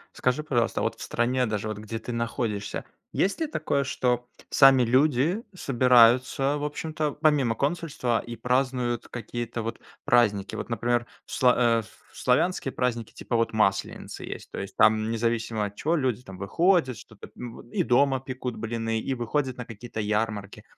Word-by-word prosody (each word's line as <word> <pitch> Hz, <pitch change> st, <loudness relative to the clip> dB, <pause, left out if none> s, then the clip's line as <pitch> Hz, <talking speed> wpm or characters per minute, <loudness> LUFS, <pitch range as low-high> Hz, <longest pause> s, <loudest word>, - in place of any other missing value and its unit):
Скажи, 130 Hz, +4 st, 0 dB
пожалуйста, 120 Hz, -7 st, 0 dB
а -, -, -1 dB
вот -, -, -1 dB
в -, -, -10 dB
стране, 125 Hz, +2 st, 0 dB
даже 105 Hz, 0 st, -2 dB
вот 110 Hz, -1 st, -4 dB
где 110 Hz, +1 st, -5 dB
ты 115 Hz, +2 st, -6 dB
находишься, 115 Hz, -3 st, -3 dB, 0.3 s
есть 195 Hz, -, +1 dB
ли 320 Hz, -, 0 dB
такое, 140 Hz, -, -1 dB
что 125 Hz, -2 st, 0 dB, 0.2 s
сами 135 Hz, -2 st, +7 dB
люди 140 Hz, -, +2 dB
собираются, 130 Hz, +1 st, +4 dB
в 145 Hz, -, -5 dB
общем-то, 150 Hz, 0 st, -2 dB
помимо 150 Hz, -7 st, +2 dB
консульства 140 Hz, -6 st, -1 dB
и 120 Hz, -, -6 dB
празднуют 125 Hz, 0 st, 0 dB
какие-то 120 Hz, 0 st, -5 dB
вот 115 Hz, -, -4 dB, 0.3 s
праздники? 105 Hz, -5 st, +2 dB
Вот, -, -, -5 dB
например, 120 Hz, +1 st, 0 dB, 0.2 s
в -, -, -14 dB
сла 125 Hz, -1 st, +4 dB
а, 115 Hz, -2 st, +3 dB
в -, -, -14 dB, 0.3 s
в -, -, -20 dB
славянские 135 Hz, +3 st, +1 dB
праздники 120 Hz, -3 st, -2 dB
типа 120 Hz, -, -4 dB
вот 115 Hz, -1 st, +1 dB
Масленицы 95 Hz, -3 st, -1 dB
есть. -, -, -8 dB
То -, -, -5 dB
есть 100 Hz, 0 st, -6 dB
там 110 Hz, 0 st, +4 dB
независимо 115 Hz, -1 st, -1 dB
от 100 Hz, 0 st, -7 dB
чего 160 Hz, +9 st, 0 dB
люди 130 Hz, -7 st, 0 dB
там 95 Hz, -7 st, -11 dB
выходят, 145 Hz, -, +2 dB
что-то, 105 Hz, 0 st, -13 dB
м, 120 Hz, -1 st, -8 dB
и -, -, +1 dB
дома 135 Hz, +1 st, +3 dB
пекут 130 Hz, -2 st, -5 dB
блины, 115 Hz, 0 st, -2 dB
и 135 Hz, -, -2 dB
выходят 130 Hz, +2 st, -1 dB
на 125 Hz, -, -6 dB
какие-то 115 Hz, 0 st, -8 dB
ярмарки. 105 Hz, -1 st, -2 dB
120 Hz, 175 wpm, -26 LUFS, 115-135 Hz, 0.3 s, сами